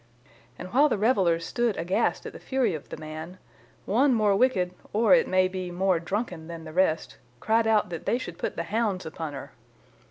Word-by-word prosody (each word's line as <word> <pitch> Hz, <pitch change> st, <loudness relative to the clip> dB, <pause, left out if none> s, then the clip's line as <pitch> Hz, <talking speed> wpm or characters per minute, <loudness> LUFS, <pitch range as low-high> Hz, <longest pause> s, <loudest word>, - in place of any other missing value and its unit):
And 185 Hz, -, -9 dB
while 290 Hz, +4 st, +5 dB
the -, -, 0 dB
revellers 190 Hz, -7 st, +2 dB
stood 240 Hz, 0 st, 0 dB
aghast 175 Hz, +4 st, 0 dB
at -, -, -7 dB
the -, -, -10 dB
fury 260 Hz, -7 st, 0 dB
of 155 Hz, -, -7 dB
the -, -, -7 dB
man, 155 Hz, +3 st, -8 dB, 0.5 s
one 255 Hz, +5 st, +3 dB
more 210 Hz, -3 st, +3 dB
wicked 190 Hz, -6 st, +2 dB, 0.2 s
or, 225 Hz, +4 st, +4 dB
it 255 Hz, -, +5 dB
may 185 Hz, 0 st, +3 dB
be, 185 Hz, -1 st, -5 dB
more 180 Hz, 0 st, +1 dB
drunken 175 Hz, -2 st, -4 dB
than 165 Hz, -1 st, -8 dB
the 155 Hz, -1 st, -9 dB
rest, 170 Hz, -3 st, 0 dB, 0.2 s
cried 225 Hz, -, +2 dB
out 215 Hz, -4 st, +2 dB
that 170 Hz, -, -6 dB
they 240 Hz, -, +2 dB
should 175 Hz, -9 st, -8 dB
put -, -, -3 dB
the 170 Hz, -, -2 dB
hounds 205 Hz, -2 st, -1 dB
upon 160 Hz, -1 st, -5 dB
her. 140 Hz, -, -8 dB
185 Hz, 200 wpm, -26 LUFS, 170-225 Hz, 0.5 s, while